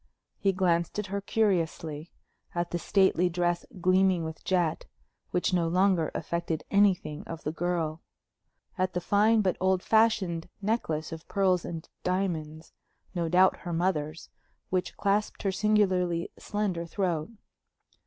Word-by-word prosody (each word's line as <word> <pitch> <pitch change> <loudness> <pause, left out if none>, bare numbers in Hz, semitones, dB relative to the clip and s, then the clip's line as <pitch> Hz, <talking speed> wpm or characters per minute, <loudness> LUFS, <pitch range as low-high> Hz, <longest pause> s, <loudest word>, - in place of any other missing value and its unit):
He 195 - +3
glanced 175 -2 +1
at 210 - -1
her 200 - -1
curiously; 170 -7 -1 0.5
at 175 0 -1
the 175 - -1
stately 185 -1 +3
dress 175 0 -1
gleaming 185 -1 +3
with 160 0 -7
jet, 175 -4 0 0.4
which 180 +1 0
no 170 -2 +2
longer 180 -1 +2
affected 170 -2 -2
anything 190 -7 +2
of 165 -1 -7
the 150 - -1
girl; 165 -1 -2 0.8
at 185 0 +1
the 180 - 0
fine 215 +5 +3
but 185 -3 0
old 185 0 +2
fashioned 215 -7 +2
necklace 195 -8 -1
of 160 0 -8
pearls 185 -3 +2
and 165 -1 -6 0.2
diamonds 165 -4 -2 0.4
no 170 -3 -1
doubt 185 +2 +5
her 175 -2 -6
mother's 165 -3 -1 0.4
which 185 -1 -1
clasped 205 +1 0
her 195 - +1
singularly 185 -4 +1
slender 190 -5 -2
throat. 170 -3 -1
180 Hz, 135 wpm, -28 LUFS, 165-195 Hz, 0.8 s, doubt